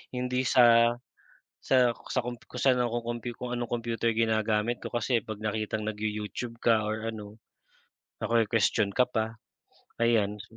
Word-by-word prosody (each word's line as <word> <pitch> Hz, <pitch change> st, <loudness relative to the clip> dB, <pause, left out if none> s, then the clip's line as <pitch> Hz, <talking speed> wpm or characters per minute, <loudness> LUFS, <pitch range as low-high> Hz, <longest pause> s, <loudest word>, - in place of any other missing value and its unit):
Hindi 125 Hz, 0 st, -1 dB
sa, 120 Hz, -2 st, +5 dB, 0.7 s
sa 125 Hz, -3 st, +3 dB, 0.2 s
sa -, -, +1 dB
komp 120 Hz, -1 st, -5 dB
kung 125 Hz, -, -6 dB
saan 125 Hz, -1 st, +3 dB
ako 120 Hz, 0 st, -1 dB
kompyu 120 Hz, +1 st, -4 dB
kung 125 Hz, 0 st, -3 dB
anong 120 Hz, -1 st, -4 dB
kompyuter 115 Hz, -1 st, -1 dB
ginagamit 110 Hz, 0 st, 0 dB
ko, -, -, -6 dB
kasi 120 Hz, 0 st, 0 dB
'pag 110 Hz, -2 st, -7 dB
nakitang 110 Hz, 0 st, -2 dB
nag-you-YouTube 110 Hz, +2 st, -4 dB
ka 115 Hz, -2 st, +3 dB
or 110 Hz, +1 st, -3 dB
ano, 105 Hz, -1 st, -7 dB, 0.8 s
nakwe-kuwestiyon 110 Hz, -3 st, +2 dB
ka 125 Hz, -, +5 dB
pa, 110 Hz, -3 st, -2 dB, 0.7 s
ayan. 105 Hz, -3 st, +2 dB
115 Hz, 140 wpm, -28 LUFS, 110-120 Hz, 0.8 s, sa